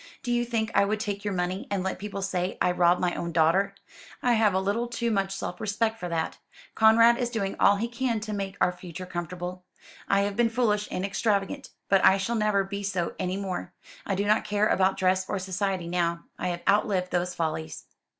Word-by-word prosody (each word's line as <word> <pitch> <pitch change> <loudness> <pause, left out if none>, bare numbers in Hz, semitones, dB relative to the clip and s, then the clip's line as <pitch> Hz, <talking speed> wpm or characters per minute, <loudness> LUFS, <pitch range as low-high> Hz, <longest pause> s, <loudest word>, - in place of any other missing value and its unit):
Do 245 - -2
you 240 0 +1
think 225 -2 -1
I - - +5
would 210 +2 0
take 205 -2 -3
your 205 -2 -2
money, 180 +2 -2
and 195 -2 -1
let 190 - -3
people 200 -1 -5
say 185 -1 -2
I 180 - +3
robbed 180 0 +3
my 180 -1 0
own 170 - -3
daughter? 170 +5 +2 0.5
I 245 - +4
have 215 -4 +3
a - - +3
little 205 +5 -1
too 235 0 -2
much 195 -2 0
self 195 -1 -5
respect 220 +1 0
for 180 - -4
that. 165 -1 -2 0.3
Conrad 230 +2 +6
is 245 -1 0
doing 205 -5 -2
all 205 - +6
he 220 +4 -1
can 235 -1 -1
to 215 0 -4
make 195 -1 -4
our - - +3
future 180 0 -8
comfortable. 180 +1 -5 0.4
I 195 0 +3
have 200 0 -1
been 235 +1 +3
foolish 220 -3 +1
and 185 - -2
extravagant. 200 +6 -1 0.2
But 195 -1 +3
I 190 - +7
shall 195 +4 -2
never 210 -3 +2
be 200 +1 -5
so 185 -4 -2
any 185 +1 -1
more. 190 -3 -4 0.3
I 195 - -1
do 200 +2 0
not 215 +1 +3
care 210 0 +1
about 190 -1 +2
dress 185 0 +1
or 205 - -1
society 185 -1 -2
now. 170 -1 -1
I - - -3
have 175 -1 -3
outlived 200 -2 +2
those 180 0 -1
follies." 160 -1 -3
195 Hz, 220 wpm, -27 LUFS, 180-215 Hz, 0.5 s, I